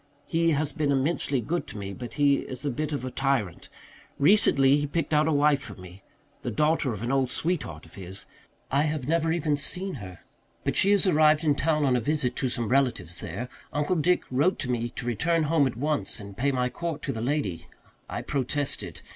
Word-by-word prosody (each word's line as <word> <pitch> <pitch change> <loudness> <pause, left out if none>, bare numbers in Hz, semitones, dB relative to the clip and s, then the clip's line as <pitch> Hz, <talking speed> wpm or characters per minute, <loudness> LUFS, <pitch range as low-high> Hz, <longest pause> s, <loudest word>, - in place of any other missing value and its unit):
He 165 0 +1
has 150 +1 0
been 150 -3 0
immensely 140 -1 0
good 170 +10 -2
to - - -8
me, 100 -1 -5
but 120 +3 -8
he 140 -1 +4
is 130 +2 -5
a 140 - 0
bit 155 +5 -3
of 140 -3 -3
a 130 - -4
tyrant. 135 -11 -1 0.5
Recently 140 -5 +5
he 145 0 -1
picked 160 +1 -2
out 150 +1 +4
a - - +2
wife 145 -1 +3
for 105 -7 -9
me 90 +1 -12 0.4
the - - -3
daughter 150 +3 +1
of 110 0 -5
an 120 - -1
old 135 -2 +2
sweetheart 135 - -2
of 80 - -18
his. 95 0 -8 0.5
I 140 +2 +3
have 150 -3 -1
never 165 0 +1
even 155 -3 +1
seen 185 +6 -3
her. 95 -2 -10 0.4
But - - -1
she 195 - +5
has 205 -1 +5
arrived 155 -3 +4
in 150 -2 +3
town 150 +1 +1
on 130 -2 +3
a 125 - +1
visit 140 -1 0
to 130 - 0
some 120 -2 -2
relatives 115 -10 0
there. 100 +9 -5 0.2
Uncle 150 +5 0
Dick 180 +4 +2
wrote 145 +9 +2
to 125 - -2
me 120 -1 -1
to 120 - -7
return 160 +8 +1
home 150 -2 +3
at 120 - -5
once 150 -1 -1
and 100 -1 -10
pay 140 +5 +1
my 125 -1 0
court 165 +4 -5
to 135 - -2
the 110 - -5
lady; 105 - -2 0.4
I - - -4
protested. 135 - -1
140 Hz, 215 wpm, -27 LUFS, 120-155 Hz, 0.5 s, Recently